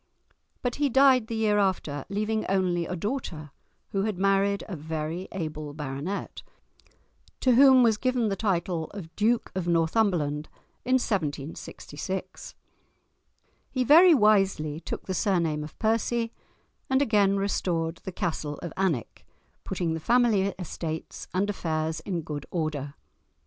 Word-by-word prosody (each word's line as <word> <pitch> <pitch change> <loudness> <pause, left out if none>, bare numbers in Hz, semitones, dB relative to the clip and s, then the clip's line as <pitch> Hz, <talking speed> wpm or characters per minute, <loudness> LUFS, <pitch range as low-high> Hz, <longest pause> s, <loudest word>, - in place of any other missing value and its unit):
But 245 -1 -1
he 290 -1 +2
died 265 -2 +5
the 230 - -4
year 215 -2 +2
after, 165 -8 -1
leaving 215 +2 -1
only 180 -3 +1
a 180 - -3
daughter, 170 - -4 0.4
who 195 - -1
had 210 -2 -1
married 195 +1 +2
a 195 - -5
very 160 +3 -4
able 155 -5 -5
baronet, 150 +6 -5 1.0
to 255 - +4
whom 260 0 +7
was 225 -3 +4
given 250 -1 +1
the 200 - 0
title 180 -5 -1
of 165 -5 -9
Duke 225 +3 +1
of 185 -2 -3
Northumberland 165 -3 +1 0.3
in 255 - 0
1766. 180 - -4 1.1
He 255 - 0
very 330 +6 +8
wisely 195 - +3
took 155 - -6
the 190 - -3
surname 170 -7 +1
of 150 - -10
Percy, 230 +1 0 0.6
and 265 0 +3
again 205 -7 +3
restored 170 -4 -1
the 190 - -7
castle 155 -4 -3
of 170 - -5
Alnwick, 175 - -1 0.4
putting 170 -3 -2
the 160 - -3
family 230 0 +3
estates 165 -3 -5
and 190 +3 0
affairs 160 -5 -2
in 175 -4 -3
good 150 -2 -6
order. 150 -4 -3
190 Hz, 135 wpm, -27 LUFS, 160-220 Hz, 1.1 s, very